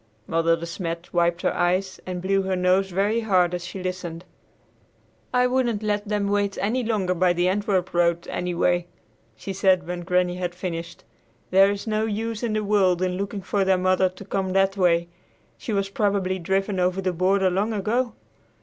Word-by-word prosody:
Mother 165 +2 +2
De 165 - -6
Smet 170 0 -5
wiped 175 0 +1
her - - +1
eyes 185 +2 0
and 180 -1 -4
blew 195 +1 +2
her 190 0 -1
nose 185 +1 +2
very 200 +5 +1
hard 185 -6 +2
as 175 -1 -3
she 185 +1 -7
listened. 180 -2 -5 1.1
"I 250 0 +3
wouldn't 245 -4 0
let 205 0 -1
them 205 -1 0
wait 200 0 0
any 240 +5 0
longer 205 -5 0
by 180 0 +2
the 175 +1 +1
Antwerp 190 -2 0
road, 170 0 +1
anyway," 175 0 0 0.5
she 195 - -6
said 190 -2 +3
when 175 +1 -4
Granny 180 0 +1
had 180 -1 -3
finished. 170 -2 -6 0.5
"There 195 +1 +6
is 200 0 -3
no 215 0 0
use 225 +1 -3
in 235 -3 -1
the 215 0 0
world 190 -3 +2
in 180 -1 0
looking 200 +1 -4
for 200 +1 0
their 190 -1 +3
mother 185 0 +2
to 185 +2 -12
come 190 -1 -2
that 195 0 +2
way. 170 -3 +2 0.5
She - - -6
was 195 -1 0
probably 200 -2 0
driven 195 +2 -1
over 180 +1 +1
the 185 -1 -1
border 190 +2 +2
long 200 +5 0
ago. 225 +4 -1
190 Hz, 185 wpm, -24 LUFS, 180-205 Hz, 1.1 s, There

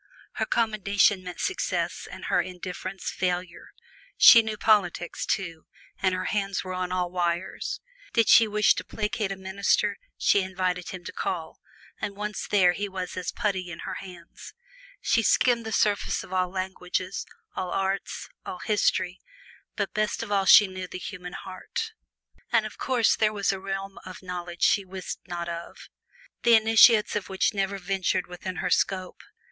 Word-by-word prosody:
Her - - 0
commendation 205 -3 +2
meant 180 -1 -8
success 375 - -2
and - - -9
her - - +2
indifference 185 +1 -6
failure. 180 -1 -3 0.5
She 230 - +10
knew 220 -1 -4
politics, 195 -6 +1
too, 165 -4 -2 0.3
and 190 -1 +2
her 185 0 -3
hands 200 -2 -1
were 185 -1 -5
on 180 0 -3
all 180 -1 -1
wires. 175 0 -2 0.3
Did 230 -1 +3
she 225 - +7
wish 210 0 +4
to - - -4
placate 210 -1 -2
a - - -2
minister, 190 - 0 0.2
she 200 - +3
invited 185 -1 -2
him 185 -2 -7
to - - -6
call, 165 -4 -4 0.4
and 200 - -4
once 210 0 -4
there 190 -4 +5
he 205 +3 -3
was 185 -1 -5
as 180 -1 -3
putty 190 -4 -2
in 160 - -8
her - - -4
hands. 180 -3 -11 0.5
She 230 - +2
skimmed 235 0 +3
the - - -4
surface 205 -1 +1
of 185 - -10
all 185 -1 +1
languages, 185 0 -3 0.3
all 185 -1 -3
arts, 195 +1 -2 0.2
all 180 - -6
history, 190 -3 0 0.6
but - - -2
best 215 +1 -1
of 215 - -8
all 195 -1 +2
she 205 - +9
knew 185 -1 -6
the 185 - -7
human 180 -1 -7
heart. 445 - -5 0.6
Of 215 -2 0
course 245 -4 +2
there 215 -1 +2
was 200 -1 +1
a 195 - -4
realm 195 0 -5
of 185 - -10
knowledge 175 -1 -5
she 200 - +4
wist 190 0 -6
not 175 -1 -4
of 170 0 -7 0.5
the 235 -1 +6
initiates 220 0 +6
of 205 -2 -3
which 190 +2 +1
never 195 0 -1
ventured 190 -1 -1
within 180 +1 -6
her - - 0
scope. 185 -2 0
190 Hz, 165 wpm, -26 LUFS, 180-210 Hz, 0.6 s, She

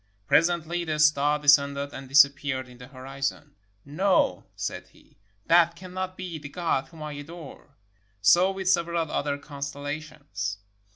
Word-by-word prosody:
Presently 170 - +2
the 155 -2 -2
star 150 -1 +3
descended 140 -1 +3
and 135 -1 -9
disap 140 0 +7
peared 130 -2 -3
in 125 -1 -15
the 125 - -11
horizon. 135 +2 -5 0.3
''No," 150 - +1
said - - -5
he, - - -25 0.3
"that 170 0 +4
cannot 185 +1 -6
be 180 -4 -6
the 145 -1 -9
God 165 -4 -1
whom 160 -2 -11
I 150 - -5
adore." 145 -1 -11 0.4
So 175 - +5
with 190 -1 -4
several 170 -3 +1
other 145 -1 -1
constel 140 -1 -7
lations. 105 - -5
145 Hz, 150 wpm, -26 LUFS, 140-170 Hz, 0.4 s, disap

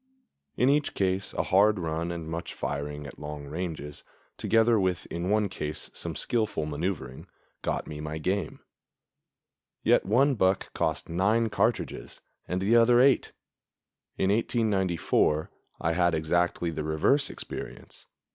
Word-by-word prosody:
In 125 - +3
each 145 +1 +2
case 95 0 0
a - - 0
hard 105 +3 +4
run 85 0 -2
and 85 -2 -5
much 85 +1 -5
firing 75 +1 -4
at 70 - -10
long 75 -1 -6
ranges, 80 -2 -5 0.3
together 115 0 +3
with 90 -2 0
in 85 +2 -2
one 105 0 +2
case 75 -5 -5
some - - -5
skillful 110 -9 0
maneuvering, 75 -4 -4 0.3
got - - -2
me 75 - -7
my 75 +1 -4
game; 95 +5 -2 1.2
yet - - +4
one 130 +8 +3
buck 95 -4 +1
cost - - -1
nine 105 +7 +2
cartridges 110 +2 -1 0.3
and 90 +1 -2
the 110 +4 +3
other 120 +1 +6
eight. 135 +1 +4 0.9
In 95 - +2
1894 95 -8 +1 0.3
I 80 - 0
had 85 -1 +2
exactly 85 +2 0
the 80 -1 -4
reverse 80 - +2
experience. - - -8
90 Hz, 135 wpm, -28 LUFS, 80-110 Hz, 1.2 s, other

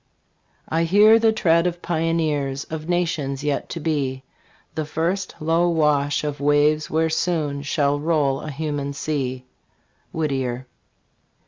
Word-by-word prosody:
I 165 +1 +1
hear 210 +6 +6
the 225 0 +4
tread 170 -5 +2
of 175 0 -4
pioneers 155 -5 -1
Of 160 +1 -7
nations 160 -6 -1
yet 145 -1 -1
to 170 - -5
be; 140 -5 -2 0.5
The 155 - -2
first 170 +5 -2
low 165 +3 +2
wash 150 -3 +1
of 150 -1 -3
waves 145 +1 +2
where 160 0 +1
soon 155 -4 -1
Shall 145 0 0
roll 150 -3 +1
a 155 - -6
human 145 -1 -3
sea. 130 -3 -3 0.7
Whittier. 130 -5 -2
155 Hz, 130 wpm, -22 LUFS, 140-165 Hz, 0.7 s, hear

